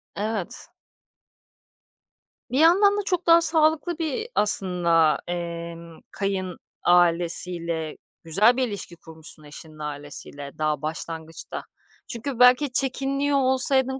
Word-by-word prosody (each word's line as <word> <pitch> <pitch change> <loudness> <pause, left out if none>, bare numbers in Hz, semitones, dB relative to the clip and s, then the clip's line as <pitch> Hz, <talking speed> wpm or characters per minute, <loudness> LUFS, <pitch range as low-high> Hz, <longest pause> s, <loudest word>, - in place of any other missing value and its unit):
Evet. 210 -2 -4 1.8
Bir 260 - 0
yandan 395 +6 +5
da - - 0
çok 360 -3 -2
daha 335 0 +6
sağlıklı 320 +1 +2
bir 325 - -3
aslında, 175 -6 +3
emm, 170 -1 -7
kayın 190 -3 -3 0.3
ailesiyle 170 -2 +1 0.3
Güzel 210 +9 +4
bir 260 -1 +1
ilişki 200 -5 -6
kurmuşsun 160 -1 -9
eşinin 155 +1 -12
ailesiyle 145 -1 -7
daha 155 0 -1
başlangıçta. 160 +1 -6 0.4
Çünkü 240 +2 -5
belki 250 +3 +5
çekiniyor 275 +2 0
olsaydın, 265 0 +3
185 Hz, 105 wpm, -24 LUFS, 165-270 Hz, 1.8 s, daha